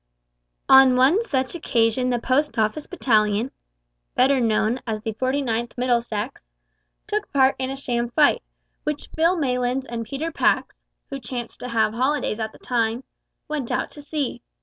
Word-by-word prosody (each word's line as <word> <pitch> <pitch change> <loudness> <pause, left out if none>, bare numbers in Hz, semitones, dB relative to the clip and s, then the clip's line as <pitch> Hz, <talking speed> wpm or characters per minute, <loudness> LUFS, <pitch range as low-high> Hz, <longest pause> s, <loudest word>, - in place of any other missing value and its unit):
On 265 -1 +7
one 270 - +4
such 265 - -1
occasion 250 -5 +1
the 245 - +1
Post 265 +5 0
Office 220 +7 0
battalion 220 - +1 0.6
(better 265 +2 +4
known 225 +1 +1
as 220 -1 -2
the 220 0 -3
49th 250 -1 -1
Middlesex) 240 -1 -1 0.6
took 425 0 -3
part 270 -1 +4
in 260 0 -2
a 270 - -3
sham 240 -3 -2
fight, 295 +4 +3 0.4
which 300 -1 -3
Phil 335 +3 +3
Maylands 250 -2 0
and 230 -1 -4
Peter 280 +8 -4
Pax - - +1 0.3
(who 275 - -4
chanced 240 -1 -6
to - - -6
have 220 -2 +1
holidays 260 -2 0
at 220 -1 -3
the - - -16
time) 235 0 -1 0.4
went 295 -5 -3
out - - -1
to 295 - -11
see. 290 -5 -3
255 Hz, 155 wpm, -23 LUFS, 230-280 Hz, 0.6 s, On